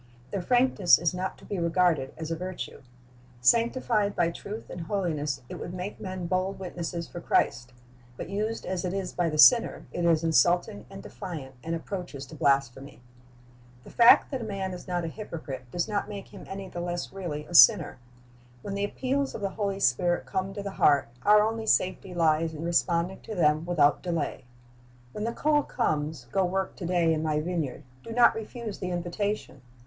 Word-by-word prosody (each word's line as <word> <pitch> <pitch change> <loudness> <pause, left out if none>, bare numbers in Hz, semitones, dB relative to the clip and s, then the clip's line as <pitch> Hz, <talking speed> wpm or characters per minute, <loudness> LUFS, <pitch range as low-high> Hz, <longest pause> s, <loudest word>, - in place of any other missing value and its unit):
Their 200 - -2
frankness 245 -4 +4
is 170 +1 0
not 185 +1 -4
to - - -16
be 200 - -3
regarded 170 -5 +2
as 160 0 -5
a - - 0
virtue. 185 +2 -6 0.6
Sanctified 230 - +2
by 170 -1 +2
truth 210 +6 -8
and 175 - -6
holiness, 155 -7 -2
it - - -8
would 175 - -6
make 185 +3 -6
men 185 -2 -5
bold 185 +3 -1
witnesses 175 -2 -5
for 175 - -8
Christ; 120 -5 0 0.5
but - - -6
used 215 +3 -3
as 185 0 -3
it 180 +1 -2
is 190 -2 -3
by 175 -2 0
the 155 - -3
sinner, 230 - +6
it 175 - -3
is 165 -1 +3
insulting 175 - +2
and 195 0 -10
defiant, 160 -9 -7
and 165 +1 -2
approaches 165 -5 -6
to 155 - -12
blasphemy. 140 -2 0 0.8
The - - -13
fact 235 +4 +6
that 265 -3 -3
a - - -4
man 195 -3 -4
is 180 - -9
not 175 -1 -1
a - - -2
hypocrite 155 - -7
does 175 +6 -2
not 210 -1 -2
make 200 -2 -7
him - - -11
any 195 0 -6
the 175 -1 -6
less 175 +1 -4
really 165 -6 -5
a 175 - -12
sinner. 170 - +7 0.6
When 200 - -5
the 200 0 -1
appeals 270 +6 -2
of - - -6
the 200 - -1
Holy 200 -2 -2
Spirit 175 +4 +1
come 190 +1 -2
to 205 - -5
the 200 - -4
heart, 145 -9 +3
our 210 0 +6
only 220 0 -2
safety 185 -1 +1
lies 160 -1 +2
in 155 - -6
responding 170 +2 0
to 220 - -7
them 155 -1 +2
without 150 -5 +3
delay. 170 -8 -3 0.7
When 210 - -4
the 230 - -1
call 295 +4 +2
comes, 155 - -2
"Go 195 - +2
work 190 +1 -2
to 175 - -5
day 170 -2 +2
in 155 - -1
My 155 -1 0
vineyard," 160 -4 -3 0.2
do 230 - -9
not 245 +1 +6
refuse 225 -1 -6
the 185 - -3
invitation. 175 -3 -3
180 Hz, 195 wpm, -27 LUFS, 160-200 Hz, 0.8 s, sinner